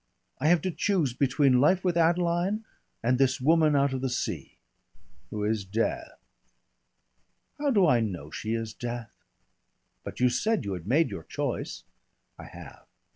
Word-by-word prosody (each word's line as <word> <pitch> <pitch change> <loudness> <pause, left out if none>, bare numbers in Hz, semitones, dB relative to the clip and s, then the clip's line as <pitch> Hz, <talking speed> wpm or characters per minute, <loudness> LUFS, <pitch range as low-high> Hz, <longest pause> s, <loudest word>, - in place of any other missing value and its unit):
I 145 - +1
have 170 -1 +4
to 185 - -1
choose 170 -8 0
between 130 -1 +3
life 180 +6 +3
with 180 -2 +1
Adeline 175 +5 +1 0.4
and 125 +2 +2
this 135 0 +2
woman 155 +2 +3
out 140 -1 +2
of 130 - -3
the 130 - -1
sea." 125 - -4 0.7
"Who 105 -1 -4
is 105 -1 0
Death." 305 - -3 1.4
"How 290 -1 +1
do 205 -8 +4
I 125 -7 +4
know 90 -9 -4
she 110 +1 -3
is 115 -1 -4
Death?" 120 -1 -6 0.9
"But - - -8
you 125 - +4
said 215 - 0
you 100 - -2
had 90 -1 -7
made 135 +1 +2
your 100 - -5
choice!" - - -4 0.6
"I - - -9
have." - - -12
135 Hz, 160 wpm, -27 LUFS, 115-175 Hz, 1.4 s, have